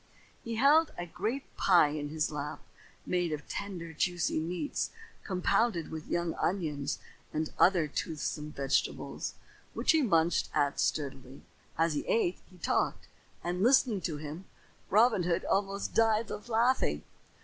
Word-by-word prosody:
He 230 0 -4
held 290 +7 +5
a 175 - -3
great 215 +11 -4
pie 175 -6 +5
in 145 0 -4
his 155 0 -1
lap, 150 0 -5 0.4
made 175 -2 0
of 150 -1 -4
tender, 180 -5 -5
juicy 175 -1 0
meats, 175 - -2 0.3
compounded 185 -1 +1
with 160 0 -6
young 170 -1 -1
onions 155 -7 -1 0.3
and 155 0 -2
other 175 -4 +5
toothsome 150 0 -3
vegetables, 140 -2 -1 0.4
which - - +3
he 320 - +4
munched 170 - +2
at 145 -2 +1
sturdily. 135 -2 -2 0.3
As 165 0 +2
he 145 - -2
ate 185 -6 +1
he 185 - -17
talked, 170 - -1 0.3
and, 180 +1 -2
listening 240 -3 +4
to 155 -4 -2
him, 155 +5 -7 0.4
Robin 220 -1 +5
Hood 175 -1 0
almost 195 0 0
died 225 -1 +3
of 210 - -7
laughing. 230 - +2
175 Hz, 140 wpm, -31 LUFS, 155-210 Hz, 0.4 s, held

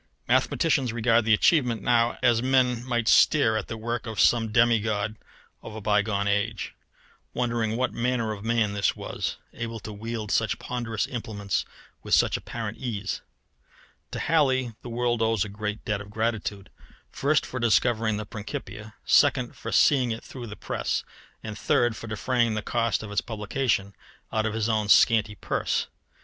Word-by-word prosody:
Mathematicians 140 -7 +2
regard 115 0 +2
the 110 - +4
achievement 120 - +2
now 120 -1 +2
as 120 -2 +4
men 125 -2 +2
might 120 -3 -1
stare 120 -5 +5
at 110 - -2
the 115 - -5
work 115 +1 -3
of 110 -4 -5
some 115 0 +3
demigod 110 -2 +2 0.5
of 110 - -9
a - - -5
bygone 105 -1 +1
age, 105 +1 -1 0.6
wondering 115 -2 0
what 130 +1 0
manner 115 -2 0
of 105 -2 -6
man 115 -2 +1
this 100 -1 +1
was, - - -4 0.2
able 115 -1 -5
to 105 - -7
wield 110 0 -5
such 110 -2 +1
ponderous 120 -3 -3
implements 110 - -3 0.4
with - - +2
such - - +3
apparent 110 -2 -5
ease. 105 -6 -3 0.9
To - - -6
Halley 130 -7 +2
the 120 - -8
world 120 0 0
owes 110 -3 +2
a - - -7
great 105 +1 -5
debt 105 -1 -1
of 100 - -10
gratitude 105 -3 -3 0.4
first, 145 +2 +1
for 125 - -5
discovering 115 -1 +2
the 105 - -4
Principia; 105 0 -7
second, - - +3
for - - -6
seeing 130 -4 +4
it 115 0 -4
through 125 -3 -8
the 105 - -7
press; - - -2 0.4
and 110 -1 -6
third, 120 +2 +1
for 115 - -8
defraying 115 +1 0
the 110 - -3
cost 115 -3 0
of 105 - -8
its 105 - +1
publication 105 -2 -1 0.4
out 110 0 +1
of 110 - -3
his 110 -1 0
own 110 -2 0
scanty 110 -1 +5
purse. - - -1
115 Hz, 165 wpm, -26 LUFS, 105-120 Hz, 0.9 s, stare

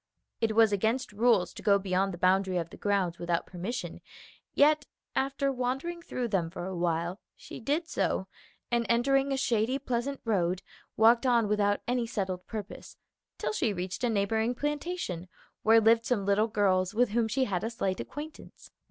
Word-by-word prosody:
It 220 -2 0
was 225 -1 +6
against 220 +6 0
rules 210 -5 +2
to - - -10
go 200 -1 +4
beyond 195 0 0
the 175 - -7
boundary 185 +1 +2
of 165 -1 -3
the - - -9
grounds 195 -4 0
without 175 -1 -1
permission; 200 +8 -5 0.5
yet 295 0 +4 0.3
after 275 +1 0
wandering 270 +7 -3
through 250 -7 -3
them 180 -6 0
for 175 0 -6
a 190 0 -4
while, 170 +2 -1 0.2
she - - -10
did 295 +8 -1
so, 190 - -1 0.5
and 235 0 +2
entering 270 +4 +2
a 270 - +1
shady, 240 0 +1
pleasant 265 +1 -2
road, 185 -4 0 0.3
walked 235 +3 +5
on 235 -3 +3
without 205 -1 +1
any 245 -1 0
settled 190 -5 -3
purpose, 215 -2 -8 0.4
till - - -2
she 230 - 0
reached 185 +4 -5
a 245 - +2
neighboring 220 +3 0
plantation 295 - -3 0.3
where 225 +1 +6
lived 225 +1 +4
some 215 -6 0
little 200 +2 +3
girls 195 -3 +1
with 245 0 +3
whom 225 +1 +1
she 260 +5 +1
had 195 -5 -1
a 225 - -1
slight 195 -5 -2
acquaintance. 300 +1 -9
220 Hz, 175 wpm, -29 LUFS, 190-250 Hz, 0.5 s, was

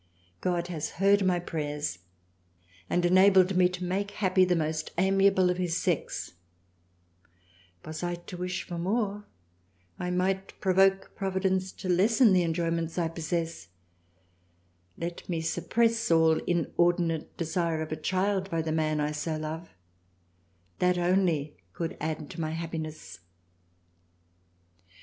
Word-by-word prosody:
God 175 -1 0
has 160 -3 -4
heard 200 +2 +4
my 185 -1 +2
Prayers 150 - -3 0.9
and 175 0 +1
enabled 185 +1 +5
me 180 0 +5
to 180 0 -6
make 195 +3 -1
happy 190 -2 +2
the 180 -1 +3
most 155 -1 -2
amiable 190 0 +4
of 180 - -3
his 175 -2 0
Sex - - -2 1.5
Was 155 0 -6
I 175 0 -1
to 175 +1 -10
wish 180 +1 -3
for 175 -2 -6
more, 205 +2 -1 0.7
I 180 - -2
might 190 +2 -1
provoke 195 +1 +3
Providence 190 -1 -1
to 190 - -7
lessen 210 +5 +4
the 185 - +4
enjoyments 165 0 -1
I 170 -2 +1
possess; 165 - -3 1.3
let 170 +2 -6
me 170 -2 -1
suppress 225 +8 +1
all 160 -1 +5
inordinate 170 -1 0
Desire 165 -1 -1
of 155 - -8
a - - 0
Child 190 +4 0
by 165 -2 -1
the 160 - -2
man 155 -1 0
I 150 0 0
so 155 +1 -3
love, 155 +2 -5 1.1
that 180 0 +3
only 175 - +1 0.2
could 165 +2 -4
add 155 -1 -3
to 170 - -6
my 155 0 -2
happiness. 160 -4 -6
175 Hz, 130 wpm, -28 LUFS, 160-190 Hz, 1.5 s, enabled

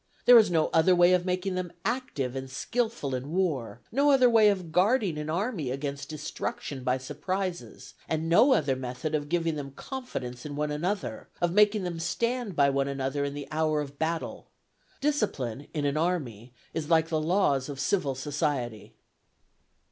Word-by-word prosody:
There 245 -1 +10
is 215 - +4
no 160 -3 +2
other 165 +3 +5
way 175 +1 +6
of 180 0 +1
making 185 +1 -1
them 185 -2 -3
active 225 - -2
and 135 0 -5
skilful 225 - -2
in 130 +2 -4
war; 155 -10 -1
no 280 +5 +3
other 255 -3 +5
way 220 -2 +6
of 185 -5 -2
guarding 195 0 +2
an 150 0 -4
army 175 - -1
against 140 +1 -4
destruction 145 -2 -5
by 125 0 +1
surprises; 175 +7 -4 0.2
and 160 0 -1
no 245 +11 +6
other 140 - +1
method 130 +4 -4
of 145 -1 -1
giving 165 -2 0
them 140 -1 -5
confidence 135 - -6
in 145 -1 -6
one 150 0 -1
another, 180 +7 -3
of 175 -1 +1
making 210 0 +4
them 175 -2 -4
stand 235 +3 -1
by 140 -1 +4
one 140 0 +1
another 140 +1 -2
in 140 0 -3
the 145 -1 -6
hour 155 -1 +1
of 145 -1 -6
battle. 165 +1 -3 0.5
Discipline 145 - -1
in 150 -3 -2
an 140 +1 0
army 135 - -2 0.2
is 160 -2 -3
like 165 -1 +3
the 160 -2 0
laws 155 -6 +1
of 140 -2 -6
civil 140 -2 0
society." 130 -5 -3
160 Hz, 175 wpm, -28 LUFS, 140-185 Hz, 0.5 s, There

